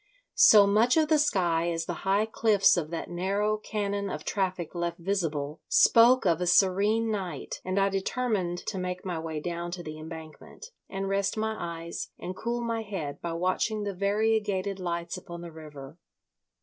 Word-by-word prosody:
So 220 Hz, -, +8 dB
much 220 Hz, +7 st, +3 dB
of 310 Hz, -1 st, +3 dB
the 310 Hz, -1 st, +4 dB
sky 175 Hz, -, +1 dB
as 165 Hz, 0 st, -2 dB
the 175 Hz, -, -3 dB
high 200 Hz, +3 st, +2 dB
cliffs 220 Hz, -3 st, +3 dB
of 165 Hz, -4 st, -2 dB
that 170 Hz, 0 st, -5 dB
narrow 200 Hz, +4 st, 0 dB
canon 205 Hz, -2 st, -3 dB
of -, -, -6 dB
traffic 185 Hz, -4 st, -2 dB
left 170 Hz, -1 st, -3 dB
visible 165 Hz, -5 st, -2 dB
spoke 240 Hz, +1 st, +6 dB
of 175 Hz, -1 st, +2 dB
a 180 Hz, -, 0 dB
serene 205 Hz, +5 st, +3 dB
night, 185 Hz, -8 st, -4 dB
and 185 Hz, +1 st, -2 dB
I 195 Hz, 0 st, +3 dB
determined 195 Hz, -2 st, -1 dB
to 190 Hz, -, -3 dB
make 180 Hz, 0 st, -4 dB
my 175 Hz, -3 st, -3 dB
way 160 Hz, -1 st, -4 dB
down 170 Hz, +2 st, -4 dB
to 180 Hz, -1 st, -6 dB
the 155 Hz, -1 st, -7 dB
Embankment, 160 Hz, -, -10 dB, 0.2 s
and 195 Hz, 0 st, -3 dB
rest 195 Hz, +1 st, 0 dB
my 220 Hz, 0 st, -1 dB
eyes 170 Hz, -3 st, -5 dB
and 180 Hz, +1 st, -6 dB
cool 235 Hz, +4 st, -3 dB
my 230 Hz, -1 st, -1 dB
head 185 Hz, -10 st, -5 dB
by 170 Hz, -1 st, -3 dB
watching 185 Hz, +5 st, 0 dB
the 200 Hz, -1 st, -3 dB
variegated 200 Hz, 0 st, 0 dB
lights 170 Hz, -1 st, -3 dB
upon 170 Hz, 0 st, -9 dB
the 170 Hz, -1 st, -8 dB
river. 150 Hz, -1 st, -11 dB
190 Hz, 175 wpm, -28 LUFS, 170-210 Hz, 0.2 s, So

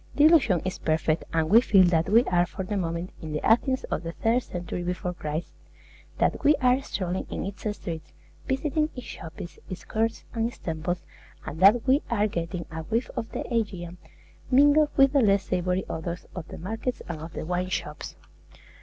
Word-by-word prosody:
The 290 Hz, -, +4 dB
illusion 270 Hz, -, +5 dB
is 185 Hz, 0 st, -3 dB
perfect, 155 Hz, 0 st, 0 dB
and 160 Hz, -1 st, +1 dB
we 225 Hz, +7 st, +7 dB
feel 195 Hz, -6 st, +5 dB
that 165 Hz, 0 st, +1 dB
we 230 Hz, +4 st, +6 dB
are 175 Hz, -4 st, +2 dB
for 190 Hz, -, -5 dB
the 205 Hz, +3 st, -3 dB
moment 170 Hz, -1 st, -2 dB
in 155 Hz, -1 st, -6 dB
the 150 Hz, -, -2 dB
Athens 260 Hz, +4 st, +3 dB
of -, -, 0 dB
the 165 Hz, -1 st, -5 dB
third 230 Hz, +6 st, +1 dB
century 175 Hz, -4 st, -5 dB
before 180 Hz, 0 st, -3 dB
Christ; 155 Hz, -1 st, -4 dB, 0.6 s
that -, -, +1 dB
we 300 Hz, -, +6 dB
are 255 Hz, 0 st, +3 dB
strolling 185 Hz, -7 st, -3 dB
in -, -, -4 dB
its 200 Hz, +2 st, -4 dB
streets, 165 Hz, -2 st, -6 dB, 0.4 s
visiting 305 Hz, +3 st, 0 dB
its 250 Hz, -, -7 dB
shops, 165 Hz, +1 st, -9 dB
its 185 Hz, -, -7 dB
courts, 225 Hz, +1 st, -1 dB
and 230 Hz, -1 st, 0 dB
its 240 Hz, -, -9 dB
temples, 170 Hz, +2 st, -3 dB, 0.4 s
and 155 Hz, 0 st, -6 dB
that 205 Hz, +5 st, +6 dB
we 270 Hz, +4 st, +4 dB
are 210 Hz, -3 st, +2 dB
getting 170 Hz, -3 st, -3 dB
a 160 Hz, 0 st, -4 dB
whiff 225 Hz, +9 st, -2 dB
of 225 Hz, -, -4 dB
the -, -, -3 dB
Aegean, 180 Hz, -6 st, -2 dB, 0.5 s
mingled 290 Hz, +3 st, +5 dB
with 275 Hz, 0 st, +6 dB
the 280 Hz, -, +5 dB
less 200 Hz, -3 st, +3 dB
savory 180 Hz, 0 st, -1 dB
odors 170 Hz, +2 st, -5 dB
of 180 Hz, -4 st, -6 dB
the -, -, -9 dB
markets 225 Hz, +8 st, -4 dB
and 160 Hz, -3 st, -5 dB
of 160 Hz, +1 st, -8 dB
the -, -, -5 dB
wine 180 Hz, +2 st, -1 dB
shops. 150 Hz, -4 st, -4 dB
185 Hz, 195 wpm, -26 LUFS, 170-230 Hz, 0.6 s, we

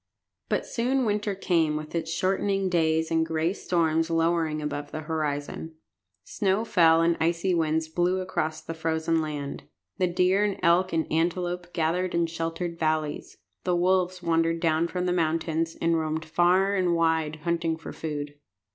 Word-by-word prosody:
But -, -, 0 dB
soon 255 Hz, +2 st, 0 dB
winter 210 Hz, -1 st, 0 dB
came 165 Hz, -5 st, +1 dB
with 155 Hz, 0 st, -7 dB
its 165 Hz, -1 st, -2 dB
shortening 195 Hz, +2 st, 0 dB
days 160 Hz, -2 st, +1 dB
and 160 Hz, 0 st, +3 dB
gray 160 Hz, +2 st, 0 dB
storms 165 Hz, -4 st, 0 dB
lowering 165 Hz, -1 st, +1 dB
above 145 Hz, -1 st, -4 dB
the 155 Hz, -, -4 dB
horizon. 155 Hz, 0 st, -3 dB, 0.5 s
Snow 195 Hz, -, 0 dB
fell, 165 Hz, -5 st, +5 dB
and 170 Hz, 0 st, +3 dB
icy 170 Hz, +3 st, +1 dB
winds 160 Hz, -1 st, +1 dB
blew 175 Hz, +3 st, 0 dB
across 185 Hz, -4 st, -2 dB
the 165 Hz, -, -6 dB
frozen 160 Hz, 0 st, 0 dB
land. 145 Hz, -2 st, -5 dB, 0.3 s
The 185 Hz, -, +3 dB
deer 180 Hz, +3 st, +2 dB
and 205 Hz, -2 st, -1 dB
elk 180 Hz, +2 st, +4 dB
and 160 Hz, -1 st, 0 dB
antelope 175 Hz, +2 st, -1 dB
gathered 175 Hz, +2 st, 0 dB
in 170 Hz, 0 st, +2 dB
sheltered 165 Hz, +1 st, -4 dB
valleys. 155 Hz, -2 st, -1 dB, 0.3 s
The 180 Hz, -1 st, +1 dB
wolves 180 Hz, 0 st, +1 dB
wandered 165 Hz, 0 st, +1 dB
down 165 Hz, 0 st, +2 dB
from 180 Hz, +1 st, -3 dB
the 180 Hz, -, +1 dB
mountains, 165 Hz, -1 st, 0 dB
and 165 Hz, 0 st, +2 dB
roamed 160 Hz, 0 st, -2 dB
far 175 Hz, +4 st, +3 dB
and 180 Hz, -3 st, +2 dB
wide, 160 Hz, -2 st, 0 dB
hunting 165 Hz, -1 st, 0 dB
for 160 Hz, -, -9 dB
food. 145 Hz, -2 st, -5 dB
165 Hz, 160 wpm, -26 LUFS, 160-180 Hz, 0.5 s, fell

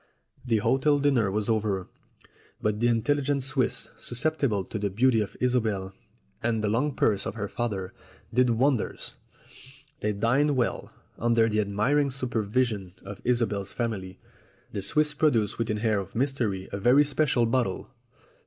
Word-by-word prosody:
The 120 Hz, -3 st, +1 dB
hotel 135 Hz, +7 st, +2 dB
dinner 135 Hz, -7 st, +2 dB
was 105 Hz, +1 st, -1 dB
over, 105 Hz, -4 st, 0 dB, 0.7 s
but 105 Hz, 0 st, -1 dB
the 120 Hz, -, +3 dB
intelligent 140 Hz, +4 st, +1 dB
Swiss, 130 Hz, -1 st, -1 dB
susceptible 125 Hz, -5 st, 0 dB
to 110 Hz, -, -5 dB
the 100 Hz, 0 st, -1 dB
beauty 115 Hz, +3 st, +3 dB
of 100 Hz, -, -5 dB
Isobel 110 Hz, -7 st, 0 dB, 0.5 s
and 115 Hz, -2 st, 0 dB
the 105 Hz, -, +1 dB
long 130 Hz, +6 st, 0 dB
purse 100 Hz, -3 st, +1 dB
of -, -, -5 dB
her 105 Hz, -2 st, -3 dB
father, 100 Hz, -4 st, -3 dB, 0.4 s
did 125 Hz, +1 st, +4 dB
wonders. 125 Hz, +1 st, 0 dB, 0.9 s
They 105 Hz, -, 0 dB
dined 125 Hz, +8 st, +2 dB
well, 125 Hz, -2 st, -1 dB, 0.3 s
under 115 Hz, -1 st, +3 dB
the 105 Hz, -1 st, 0 dB
admiring 110 Hz, +8 st, +1 dB
supervision 115 Hz, -6 st, -1 dB
of 100 Hz, 0 st, -8 dB
Isobel's 110 Hz, -5 st, 0 dB
family. 100 Hz, -6 st, -3 dB, 0.5 s
The 100 Hz, -, -3 dB
Swiss 150 Hz, +8 st, +1 dB
produced 120 Hz, -10 st, +1 dB
with 115 Hz, 0 st, -1 dB
an 105 Hz, -, 0 dB
air 110 Hz, -1 st, +1 dB
of 95 Hz, 0 st, -8 dB
mystery 120 Hz, -7 st, -1 dB
a 100 Hz, -, -4 dB
very 125 Hz, +8 st, +5 dB
special 140 Hz, -4 st, +2 dB
bottle. 115 Hz, -5 st, -1 dB
115 Hz, 150 wpm, -27 LUFS, 105-130 Hz, 0.9 s, very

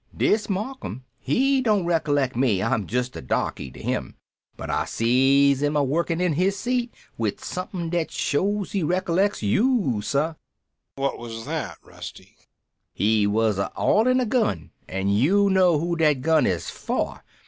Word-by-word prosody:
Dis 210 Hz, -1 st, +2 dB
Marcum 200 Hz, -, -4 dB, 0.2 s
he 265 Hz, -, +2 dB
don't 210 Hz, -7 st, +2 dB
recollect 145 Hz, -6 st, +1 dB
me, 115 Hz, -7 st, +2 dB
I'm 110 Hz, -3 st, 0 dB
just 125 Hz, +2 st, -2 dB
a -, -, -6 dB
darky 65 Hz, +1 st, -2 dB
to -, -, -13 dB
him. -, -, -3 dB, 0.4 s
But -, -, -5 dB
I -, -, 0 dB
sees 135 Hz, +4 st, +3 dB
'im 145 Hz, +1 st, 0 dB
a 145 Hz, -, +3 dB
workin' 165 Hz, +4 st, 0 dB
in 180 Hz, -3 st, +1 dB
his 190 Hz, +6 st, +1 dB
seat 245 Hz, 0 st, -1 dB, 0.3 s
wid 110 Hz, -3 st, -1 dB
som'pin 180 Hz, -2 st, -5 dB
dat 170 Hz, -2 st, 0 dB
shows 195 Hz, +8 st, -1 dB
he 200 Hz, -, -1 dB
recollects 180 Hz, -, 0 dB
you, 190 Hz, -, +2 dB
sah." 145 Hz, +9 st, 0 dB, 0.6 s
"What 135 Hz, 0 st, -2 dB
was 115 Hz, -1 st, -7 dB
that, -, -, -4 dB
Rusty?" -, -, -11 dB, 0.6 s
"He 105 Hz, 0 st, +2 dB
was 105 Hz, -1 st, +1 dB
a 100 Hz, -, -1 dB
oilin' 255 Hz, +4 st, +3 dB
a 255 Hz, -, +1 dB
gun 215 Hz, -, 0 dB, 0.2 s
an' 95 Hz, +1 st, -1 dB
you 185 Hz, -, +3 dB
know 185 Hz, -4 st, +4 dB
who 170 Hz, +3 st, -1 dB
dat 150 Hz, -5 st, +2 dB
gun 160 Hz, +1 st, +3 dB
is 90 Hz, -4 st, -1 dB
for. -, -, -3 dB
155 Hz, 160 wpm, -24 LUFS, 120-195 Hz, 0.6 s, know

